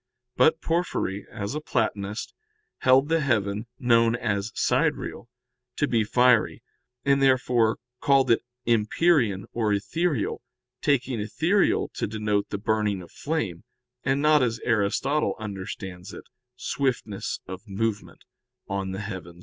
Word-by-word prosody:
But 160 Hz, +1 st, +4 dB
Porphyry, 165 Hz, -, -1 dB
as 100 Hz, +4 st, -4 dB
a 150 Hz, -, -3 dB
Platonist, 105 Hz, -5 st, -2 dB, 0.5 s
held 130 Hz, +2 st, +5 dB
the 165 Hz, +1 st, +2 dB
heaven, 110 Hz, -6 st, 0 dB
known 115 Hz, -2 st, +3 dB
as 110 Hz, -3 st, -2 dB
sidereal, -, -, 0 dB, 0.5 s
to -, -, +1 dB
be 115 Hz, -2 st, +2 dB
fiery, 125 Hz, +1 st, +3 dB, 0.4 s
and 140 Hz, 0 st, +3 dB
therefore 125 Hz, -4 st, +3 dB, 0.2 s
called 135 Hz, -3 st, +3 dB
it 115 Hz, -, +4 dB, 0.2 s
empyrean 115 Hz, -, +2 dB
or 110 Hz, -3 st, 0 dB
ethereal, 140 Hz, -, -1 dB, 0.4 s
taking 130 Hz, -4 st, +1 dB
ethereal 165 Hz, -, +1 dB
to -, -, -2 dB
denote 105 Hz, -1 st, -1 dB
the 100 Hz, -, -3 dB
burning 105 Hz, -2 st, 0 dB
of 85 Hz, -, -15 dB
flame, 125 Hz, -, -3 dB, 0.4 s
and 135 Hz, +2 st, +1 dB
not 150 Hz, -1 st, +5 dB
as 115 Hz, -2 st, 0 dB
Aristotle 120 Hz, +7 st, +1 dB
understands 95 Hz, -3 st, -7 dB
it, -, -, -9 dB, 0.3 s
swiftness 125 Hz, -6 st, -2 dB
of 95 Hz, +4 st, -8 dB
movement 105 Hz, +1 st, -3 dB, 0.4 s
(De 95 Hz, +1 st, -3 dB
Coel. 90 Hz, -4 st, -7 dB
115 Hz, 125 wpm, -26 LUFS, 100-135 Hz, 0.5 s, held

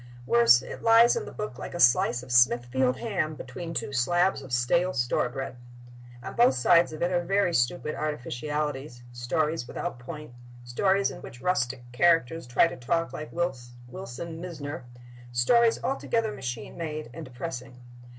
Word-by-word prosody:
Worse, 120 Hz, +1 st, +5 dB
it -, -, -8 dB
lies 230 Hz, +1 st, +6 dB
in 460 Hz, -2 st, -3 dB
the -, -, -8 dB
book 170 Hz, -12 st, -6 dB
like -, -, -7 dB
a -, -, -4 dB
slice 120 Hz, -2 st, +4 dB
of 125 Hz, -, -10 dB
Smithfield 120 Hz, +1 st, +3 dB
ham 180 Hz, -9 st, -2 dB
between 155 Hz, +6 st, -7 dB
two 145 Hz, -3 st, -3 dB
slabs 175 Hz, +8 st, +2 dB
of 135 Hz, -1 st, -11 dB
stale 170 Hz, +10 st, +2 dB
store 120 Hz, -1 st, 0 dB
bread. 135 Hz, 0 st, -6 dB, 0.7 s
On -, -, -6 dB
both 235 Hz, -, +5 dB
sides 170 Hz, +7 st, +4 dB
of 155 Hz, +1 st, -4 dB
it 175 Hz, -, +1 dB
are 175 Hz, -1 st, +1 dB
very 195 Hz, 0 st, +1 dB
stupid 150 Hz, +4 st, 0 dB
artificialities—stories 145 Hz, 0 st, -3 dB
without 120 Hz, -, -5 dB
point, 150 Hz, +1 st, -9 dB, 0.3 s
stories 190 Hz, +11 st, +1 dB
in -, -, -10 dB
which 120 Hz, -, -11 dB
rustic 130 Hz, -6 st, -1 dB
characters 165 Hz, 0 st, +2 dB
try 125 Hz, +6 st, +4 dB
to 170 Hz, -, -4 dB
talk 165 Hz, +7 st, -1 dB
like 155 Hz, -, -7 dB
Wilson 135 Hz, +2 st, -6 dB
Mizner, 150 Hz, -6 st, -6 dB, 0.5 s
stories 225 Hz, -, +3 dB
altogether 230 Hz, -4 st, -1 dB
machine 120 Hz, -, -6 dB
made 155 Hz, -5 st, -5 dB
and 165 Hz, -, -7 dB
depressing. 125 Hz, -2 st, -7 dB
145 Hz, 155 wpm, -27 LUFS, 125-175 Hz, 0.7 s, lies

